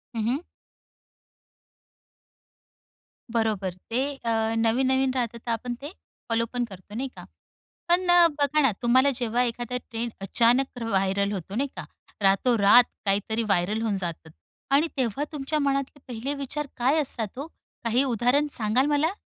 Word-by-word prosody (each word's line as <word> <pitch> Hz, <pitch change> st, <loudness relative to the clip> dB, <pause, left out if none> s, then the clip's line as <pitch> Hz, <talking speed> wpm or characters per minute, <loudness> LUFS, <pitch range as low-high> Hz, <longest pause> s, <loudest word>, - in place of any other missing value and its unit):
हं, 225 Hz, -, -1 dB
हं. 265 Hz, +5 st, +1 dB, 2.9 s
बरोबर 215 Hz, -5 st, 0 dB, 0.2 s
ते 240 Hz, +3 st, 0 dB, 0.2 s
अ, 225 Hz, 0 st, +1 dB
नवीन-नवीन 260 Hz, +3 st, +2 dB
राहतं 235 Hz, -2 st, -2 dB
तर 235 Hz, +1 st, -5 dB
आपण 240 Hz, +2 st, -2 dB
ते 290 Hz, +4 st, -7 dB, 0.4 s
फॉलो 230 Hz, 0 st, +1 dB
पण 245 Hz, -1 st, 0 dB
करतो 200 Hz, -1 st, -12 dB
नाही 265 Hz, +3 st, -2 dB
का? -, -, -10 dB, 0.6 s
पण 355 Hz, +1 st, +3 dB, 0.3 s
बघा 290 Hz, +1 st, +3 dB
ना, 270 Hz, -4 st, +4 dB
तुम्हाला 255 Hz, +3 st, +4 dB
जेव्हा 240 Hz, 0 st, 0 dB
एखादा 240 Hz, +1 st, -3 dB
ट्रेंड 230 Hz, +1 st, -3 dB
अचानक 240 Hz, +6 st, +2 dB
व्हायरल 200 Hz, -1 st, +1 dB
होतो 195 Hz, +1 st, -5 dB
नाही 275 Hz, +3 st, 0 dB
का? 175 Hz, -4 st, -6 dB, 0.4 s
रातोरात 205 Hz, +3 st, +5 dB, 0.2 s
काहीतरी 205 Hz, +3 st, 0 dB
व्हायरल 205 Hz, +1 st, 0 dB
होऊन 215 Hz, -3 st, 0 dB
जातं 170 Hz, -3 st, -5 dB, 0.5 s
आणि 305 Hz, +4 st, +4 dB
तेव्हा 260 Hz, +2 st, 0 dB
तुमच्या 300 Hz, +1 st, -2 dB
मनातले 275 Hz, 0 st, -1 dB
पहिले 250 Hz, +3 st, -4 dB
विचार 295 Hz, +2 st, -4 dB
काय 260 Hz, +6 st, +2 dB
असतात 235 Hz, -6 st, -2 dB
हो? 285 Hz, -, -5 dB, 0.4 s
काही 235 Hz, +3 st, +2 dB
उदाहरण 255 Hz, +3 st, +2 dB
सांगाल 230 Hz, +3 st, +2 dB
मला? 295 Hz, +3 st, +2 dB
235 Hz, 140 wpm, -26 LUFS, 220-270 Hz, 2.9 s, रातोरात